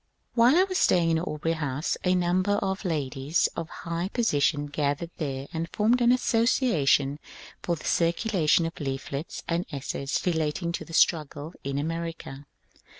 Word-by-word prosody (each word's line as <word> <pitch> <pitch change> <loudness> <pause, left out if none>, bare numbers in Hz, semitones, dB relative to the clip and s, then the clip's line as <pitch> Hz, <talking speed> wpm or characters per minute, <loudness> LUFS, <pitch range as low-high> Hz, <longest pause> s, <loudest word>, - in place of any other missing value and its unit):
While 240 +4 +5
I 365 - +6
was 375 -1 -1
staying 170 -2 +3
in 160 - +2
Aubrey 165 -1 -2
House 145 -1 -2
a 180 0 +3
number 180 +3 +1
of 195 -1 -1
ladies 145 -1 0
of 165 -1 -4
high 170 +1 -4
position 150 - +1
gathered 145 +3 -2
there 135 -3 -3
and 165 +1 -3
formed 230 +4 +2
an 240 0 +5
association 225 - +2 0.4
for 170 - -1
the 155 - -11
circulation 170 -1 +2
of 165 - -6
leaflets 140 +1 -4
and 170 +1 0
essays 140 -1 -3
relating 165 0 0
to - - -4
the 165 - -12
struggle 155 -1 +1
in 140 0 -3
America. 165 -2 -5
165 Hz, 150 wpm, -27 LUFS, 145-185 Hz, 0.4 s, I